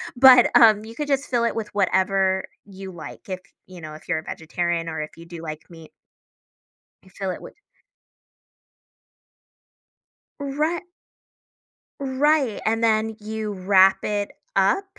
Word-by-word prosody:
But, 250 -1 +8
um, 215 -3 +6
you 225 - -10
could 295 +2 -4
just 280 0 0
fill 240 -2 +1
it 235 - -1
with 220 -2 -4
whatever 190 -1 +1 0.2
you 195 -1 -9
like. 170 -3 -10
If 185 -1 -3 0.3
you 180 -2 -12
know, 155 -1 -8
if 155 - -15
you're - - 0
a - - -10
vegetarian 170 +1 -3
or 160 -1 -4
if 155 +2 -8
you 170 - -12
do 170 -1 -9
like 155 -1 -7
meat 165 -2 -13 1.1
you 190 - -19
fill 190 0 -4
it - - -7
with - - -12 2.8
Righ 300 +5 -2 1.1
right, 275 -2 +1
and 225 +1 +1
then 220 0 +2
you 215 0 -4
wrap 190 0 +4
it 205 -1 -2 0.3
up 195 - +3
200 Hz, 145 wpm, -23 LUFS, 180-235 Hz, 2.8 s, But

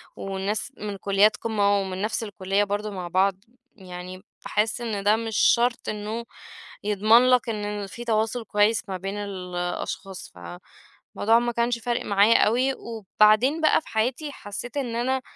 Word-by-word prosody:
والناس 195 +5 -3
من 205 -1 -5
كليات 200 +2 +3
قمة 205 -3 +1
ومن 190 -1 -4
نفس 215 +2 -1
الكلية 195 0 -1
برضو 205 +1 -3
مع 185 -3 -5
بعض، 190 +2 +2 0.4
يعني 185 -1 -9 0.2
باحس 220 +3 0
إن 215 -4 -3
ده 205 +1 +4
مش 225 -1 -3
شرط 240 0 +3
إنه 215 +2 -4 0.6
يضمن 215 +4 +4
لك 250 -2 +3
إنه 205 -2 -3
فيه 235 +5 -9
تواصل 225 +1 0
كويس 210 +1 +1
ما 190 - -3
بين 195 +2 -5
الأشخاص، 185 -1 -5
فالموضوع 90 - -2
ما 240 0 -1
كانش 235 0 0
فارق 240 +1 -2
معايا 205 +3 +5
أوي. 255 +5 +2
وبعدين 225 - +2
بقى 310 - +4
في - - -21
حياتي 250 +7 -1
حسيت 240 +2 -7
إن 245 -5 -2
أنا 260 +2 0
210 Hz, 150 wpm, -25 LUFS, 195-235 Hz, 0.6 s, معايا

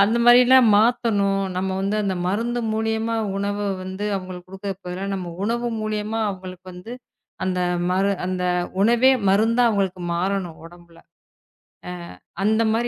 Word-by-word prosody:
அந்த 225 +4 +2
மாரிலாம் 250 0 +7
மாத்தணும். 205 -3 +2
நம்ம 190 +1 -1
வந்து 200 +2 -1
அந்த 195 -2 -1
மருந்து 235 +5 -1
மூலியமா 220 +1 -1 0.2
உணவ 200 0 -2 0.3
வந்து 190 +2 -5
அவங்களுக்கு 185 -1 -8
குடுக்கறக்கு 195 0 -7
பதிலா 180 +2 -4
நம்ம 180 -3 -5
உணவு 235 +2 -1
மூலியமா 215 +1 -2
அவங்களுக்கு 185 -1 -8
வந்து 180 +7 -9 0.5
அந்த 185 -1 -1 0.3
மரு 195 +2 +2 0.2
அந்த 185 -1 -2 0.4
உணவே 240 +4 +5 0.2
மருந்தா 225 +5 +3
அவங்களுக்கு 190 -3 -1
மாறணும் 180 -1 -2
உடம்புல. 170 -1 -17 0.9
அ - - -4 0.5
அந்த 220 +2 +3
மாதிரி 240 +2 0
200 Hz, 135 wpm, -22 LUFS, 185-225 Hz, 0.9 s, மாரிலாம்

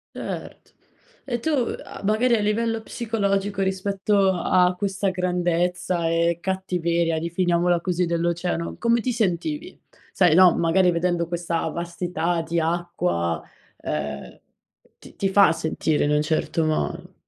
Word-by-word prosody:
Certo. - - -7 0.5
E 240 -3 -2
tu 320 - -2 0.3
a - - -10
magari 230 +4 +3
a - - 0
livello 225 +2 0
psicologico 200 -4 -1
rispetto 195 +1 +1
a 180 0 +2
questa 200 0 -1
grandezza 180 -1 0
e 170 0 +1
cattiveria, 170 -3 -1
definiamola 170 +1 +1
così, 180 -1 0
dell'oceano, 170 0 -1
come 235 0 +2
ti 255 - -1
sentivi? 240 - -2 0.3
Sai 175 -4 +4
no, 185 -2 +7
magari 175 +2 +3
vedendo 170 0 0
questa 170 -1 -2
vastità 170 0 -2
di 170 +1 0
acqua, 125 - -1 0.4
ehm, 75 -1 -5 0.6
ti - - -15
ti 195 - 0
fa 200 -1 +6
sentire 160 -1 -1
in 145 - +1
un 150 0 +3
certo 160 +1 0
modo. 155 0 -2
180 Hz, 130 wpm, -23 LUFS, 170-195 Hz, 0.6 s, no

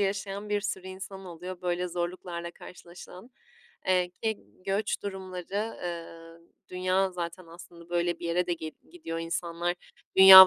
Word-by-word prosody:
yaşayan 200 +1 0
bir 205 0 +3
sürü 190 -2 -2
insan 190 +1 -6
oluyor 180 +1 -6
böyle 180 0 +1
zorluklarla 175 0 -2
karşılaşılan. 180 +5 -11 0.6
Eee, 180 -1 +4
ki 220 +3 -1 0.3
göç 205 +2 +1
durumları, 190 +2 -2
eee, 165 -1 -5 0.3
dünya 185 +1 +3
zaten 175 0 -4
aslında 170 0 -12
böyle 175 0 +2
bir - - -3
yere 175 +1 +3
de 175 - +2
gid 160 -2 -3 0.2
gidiyor, 165 - -3
insanlar 170 +1 0 0.4
dünya 190 0 +15
180 Hz, 140 wpm, -30 LUFS, 170-190 Hz, 0.6 s, dünya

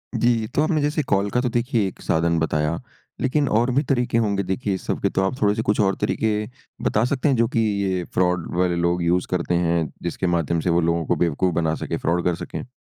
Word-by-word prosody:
जी। 115 -2 +2
तो - - +3
आपने 155 -1 +1
जैसे 150 +2 +1
कॉल 100 -5 +1
का 120 - 0
तो 125 - 0
देखिए 120 -3 0
एक - - -9
साधन 85 +1 +1
बताया 75 0 0 0.4
लेकिन 140 +2 +1
और 120 +4 +2
भी 140 - +3
तरीके 125 -4 0
होंगे 100 -3 +1
देखिए 95 +2 -2
इस 95 - -5
सब - - -1
के। - - +2
तो - - 0
आप 95 +8 -2
थोड़े-से 105 +1 +2
कुछ 105 -1 0
और 95 -1 +2
तरीके 110 - 0 0.5
बता 110 - +1
सकते 135 +3 0
हैं 135 - +3
जो 115 -1 +2
कि 115 - -1
ये 100 -4 0
फ्रॉड 90 -1 +1
वाले 90 -1 +2
लोग 85 0 0
यूज़ 90 +1 +1
करते 90 -1 0
हैं 85 -2 +1 0.2
जिसके 85 +2 -2
माध्यम 85 -1 +1
से 85 - -1
वो 85 0 +3
लोगों 85 0 0
को - - +1
बेवकूफ 85 +2 +1
बना 80 -2 +1
सकें, - - -3
फ्रॉड 85 +1 0
कर 90 -1 +2
सकें? 85 - -7
95 Hz, 235 wpm, -23 LUFS, 85-115 Hz, 0.5 s, तो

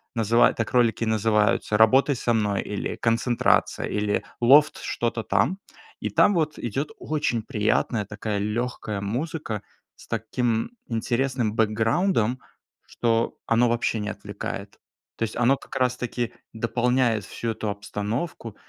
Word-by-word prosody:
называют 115 +1 +3
так 115 - -2
ролики 115 -2 +3
и - - -1
называются 105 -1 +2
"Работай 130 +6 +5
со 120 -1 0
мной", 105 -3 +1
или 105 - -4
"Концентрация", 115 +1 +1
или 105 0 -1 0.2
"Лофт", 145 +5 +6
что-то 115 -1 -2
там. 115 - +1 0.4
И - - -2
там 205 - +4
вот 155 -2 0
идёт 135 +6 -3
очень 150 -7 -1
приятная 110 -1 0
такая 105 0 -4
лёгкая 105 -1 -2
музыка 115 0 -3 0.3
с - - -16
таким 115 0 -1 0.2
интересным 120 0 -1
бэкграундом, 115 - +1 0.5
что 115 -1 0
оно 120 +1 +4
вообще 115 -1 0
не 105 - -3
отвлекает. - - -6 0.4
То - - -1
есть 110 - -3
оно 125 +3 +3
как - - -12
раз-таки 125 -2 -1 0.2
дополняет 120 -1 +1
всю 115 - -4
эту 110 -1 -3
обстановку, 105 - -4
115 Hz, 130 wpm, -25 LUFS, 105-125 Hz, 0.5 s, Лофт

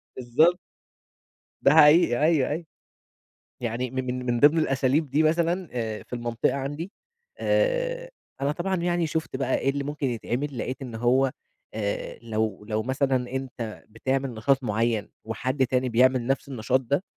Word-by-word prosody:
بالضبط. 140 +8 +3 1.0
ده 140 - +5
حقيقي 150 -5 +6
أيوه، 155 -5 +3
أيوه. 160 +3 -3 0.9
يعني 120 +1 -3
من 125 -1 -3
من 120 -1 0
ضمن 150 +3 +6
الأساليب 140 0 +1
دي 150 +4 +2
مثلًا 170 +2 +1
آآ 110 -3 -3
في - - -13
المنطقة 120 +1 -1
عندي 145 +7 -4 0.5
آآ - - 0 0.3
أنا 140 +1 +1
طبعًا 185 +4 -1
يعني 175 -1 0
شُفت 160 -3 -3
بقى 130 -1 0
إيه 135 - 0
اللي 140 0 -1
ممكن 145 -1 -2
يتعمل 125 +3 -3
لقيت 130 +3 -4
إن 120 -4 -6
هو 130 +3 +2 0.4
آآ 105 -2 -3
لو 110 -3 -2
لو 110 0 0
مثلًا 130 +1 +1 0.2
أنت 125 -4 -5
بتعمل 130 +3 -2
نشاط 130 +5 +1
معيّن 110 -1 0
وحد 130 +4 -1
تاني 125 0 0
بيعمل 125 +1 +3
نفس 135 +1 -1
النشاط 130 +1 +1
ده، 140 +9 0
130 Hz, 150 wpm, -26 LUFS, 120-150 Hz, 1.0 s, حقيقي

